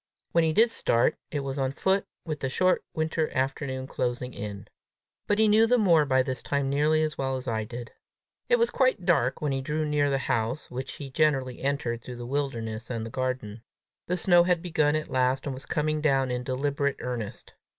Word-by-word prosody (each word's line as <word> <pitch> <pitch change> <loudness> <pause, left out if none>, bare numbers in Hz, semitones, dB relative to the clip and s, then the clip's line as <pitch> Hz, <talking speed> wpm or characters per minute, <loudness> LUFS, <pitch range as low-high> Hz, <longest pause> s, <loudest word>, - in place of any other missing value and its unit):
When 170 - +3
he 160 - +2
did 225 +8 +4
start, 120 - +2
it 145 - -2
was 135 0 -4
on 135 0 0
foot, 190 +6 +1 0.2
with 155 -3 -3
the 135 - -2
short 185 +7 +2
winter 160 0 0
afternoon 130 0 -1
closing 125 -1 -3
in. 100 0 -6 0.6
But 205 - +2
he 220 0 +4
knew 220 +2 +5
the 250 +2 +4
moor 170 -9 +4
by 130 -2 +3
this 130 -2 -4
time 140 -1 -1
nearly 155 +2 +3
as 155 -1 -3
well 135 -1 0
as 130 - -8
I 110 -2 -1
did. 120 +1 -8 0.6
It 480 - +5
was 470 0 +2
quite 255 -9 +2
dark 140 -8 +2
when 150 - +1
he 135 0 -1
drew 155 +3 -1
near 150 -1 +1
the 135 - +1
house, 115 0 -2
which 130 +1 -5
he 140 -2 -8
generally 135 -4 +1
entered 135 -4 -1
through 125 - -7
the 120 - -6
wilderness 115 -5 -3
and 115 -3 -3
the 115 - -7
garden. 130 -4 -3 0.5
The 180 - 0
snow 175 0 +5
had 175 -1 +1
begun 155 -4 +2
at 155 0 -2
last, 130 +1 +1
and 140 - -2
was 130 +1 -9
coming 155 0 0
down 135 -4 +2
in 125 0 -2
deliberate 140 +2 -1
earnest. 120 -5 -5
135 Hz, 210 wpm, -27 LUFS, 125-155 Hz, 0.6 s, knew